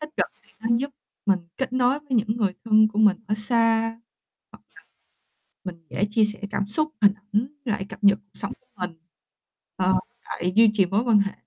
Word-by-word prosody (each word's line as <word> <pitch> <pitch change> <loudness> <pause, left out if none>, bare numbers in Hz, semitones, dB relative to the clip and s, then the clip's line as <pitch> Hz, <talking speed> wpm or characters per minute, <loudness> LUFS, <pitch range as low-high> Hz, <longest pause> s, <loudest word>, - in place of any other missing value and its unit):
tích 305 0 -7
cực - - +1 0.2
thì - - -26
nó 225 - -3
giúp 280 +4 -3 0.4
mình 195 -1 +3 0.2
kết 265 -1 -3
nối 255 +2 +2
với 295 - -30
những 220 -2 +1
người 205 -5 0
thân 215 -1 +5
của 215 - -6
mình 210 -3 +5
ở 210 - 0
xa. 225 +1 +3
Hoặc 225 - -1
là 225 - -19 1.8
mình 165 - -30
dễ - - 0
chia 215 0 +3
sẻ 210 0 +1
cảm 200 -1 -2
xúc 305 +9 +3
hình 205 - +6
ảnh 205 0 -31 0.3
với 225 - -1
lại 195 -1 -3
cập 205 - -9
nhật 200 0 +6
cuộc 200 0 -12
sống - - 0
của 255 - -40
mình. 180 -1 -4 0.9
Ờ, 185 0 +2
với 235 +6 -3 0.2
lại 180 +1 -1
duy 225 -1 +7
trì 195 -3 +3
mối 200 +5 0
quan 230 -4 +4
hệ 200 -1 0
215 Hz, 220 wpm, -24 LUFS, 200-230 Hz, 1.8 s, duy